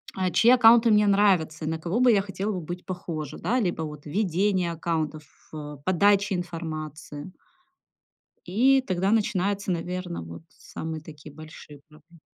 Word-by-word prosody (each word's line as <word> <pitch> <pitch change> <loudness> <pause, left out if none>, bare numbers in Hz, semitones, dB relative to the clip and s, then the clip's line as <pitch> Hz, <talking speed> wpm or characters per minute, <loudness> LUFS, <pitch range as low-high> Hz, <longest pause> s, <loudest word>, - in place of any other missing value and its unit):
а, 185 -1 -1
чьи 235 - +4
аккаунты 235 -1 +6
мне 210 -1 +4
нравятся, 180 -6 +2
и - - -3
на 160 - -2
кого 175 +8 -2
бы 250 -1 +5
я 200 -3 +3
хотела 195 +2 -4
бы 185 - -4
быть 175 +3 -7
похожа. 165 -5 -6
Да, 250 +3 0
либо 175 -6 -1
вот 150 -2 -8
ведение 185 +1 0
аккаунтов, 160 -2 -3
ф 150 0 -11
подача 200 +2 +3
информации. 160 -2 -6 1.2
И 260 +9 +4
тогда 190 +2 0
начинаются, 200 -2 0
наверно, 180 - -4
вот 85 - -10
самые 160 +2 -7
такие 150 -1 -12
большие 155 -2 -12
проблемы. 160 +2 -20
175 Hz, 150 wpm, -25 LUFS, 155-200 Hz, 1.2 s, аккаунты